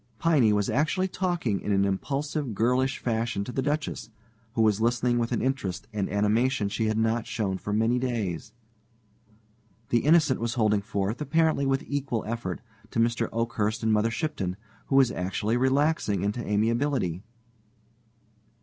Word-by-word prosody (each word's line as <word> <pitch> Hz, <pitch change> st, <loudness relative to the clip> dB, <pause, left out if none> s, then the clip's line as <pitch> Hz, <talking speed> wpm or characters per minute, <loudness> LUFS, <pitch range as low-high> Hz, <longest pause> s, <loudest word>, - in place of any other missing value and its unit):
Piney 145 Hz, -10 st, +3 dB
was 105 Hz, -1 st, +1 dB
actually 160 Hz, +6 st, +1 dB
talking 175 Hz, -, -1 dB
in 105 Hz, -, -2 dB
an 100 Hz, 0 st, +3 dB
impulsive, 135 Hz, +5 st, -2 dB
girlish 125 Hz, +5 st, +1 dB
fashion 115 Hz, -3 st, -1 dB
to 115 Hz, -, -6 dB
the 135 Hz, -, -1 dB
Duchess, 145 Hz, -5 st, -2 dB, 0.5 s
who 115 Hz, -, +3 dB
was 110 Hz, -1 st, +2 dB
listening 120 Hz, +1 st, +2 dB
with 115 Hz, 0 st, -1 dB
an 120 Hz, -, 0 dB
interest 105 Hz, -7 st, -2 dB
and 100 Hz, -2 st, -1 dB
animation 105 Hz, +3 st, +1 dB
she 110 Hz, +2 st, -1 dB
had 110 Hz, 0 st, 0 dB
not 115 Hz, +1 st, 0 dB
shown 95 Hz, -4 st, -2 dB
for 105 Hz, -, -5 dB
many 115 Hz, +4 st, +2 dB
days. 110 Hz, -7 st, -3 dB, 1.4 s
The 120 Hz, -, +3 dB
Innocent 150 Hz, -1 st, +4 dB
was 120 Hz, +1 st, -2 dB
holding 105 Hz, -3 st, +2 dB
forth, 100 Hz, +4 st, -2 dB
apparently 155 Hz, -1 st, +2 dB
with 135 Hz, 0 st, +1 dB
equal 135 Hz, -5 st, -2 dB
effect, 110 Hz, -6 st, -4 dB, 0.3 s
to -, -, -6 dB
Mr. 115 Hz, 0 st, +1 dB
Oakhurst 115 Hz, -1 st, -1 dB
and 110 Hz, -1 st, +3 dB
Mother 105 Hz, +2 st, +2 dB
Shipton, 115 Hz, -, -3 dB, 0.3 s
who 135 Hz, -, 0 dB
was 135 Hz, -3 st, +5 dB
actually 95 Hz, +5 st, -1 dB
relaxing 130 Hz, -, +1 dB
into 105 Hz, +4 st, -1 dB
amiability. 110 Hz, -, 0 dB
115 Hz, 155 wpm, -27 LUFS, 105-135 Hz, 1.4 s, was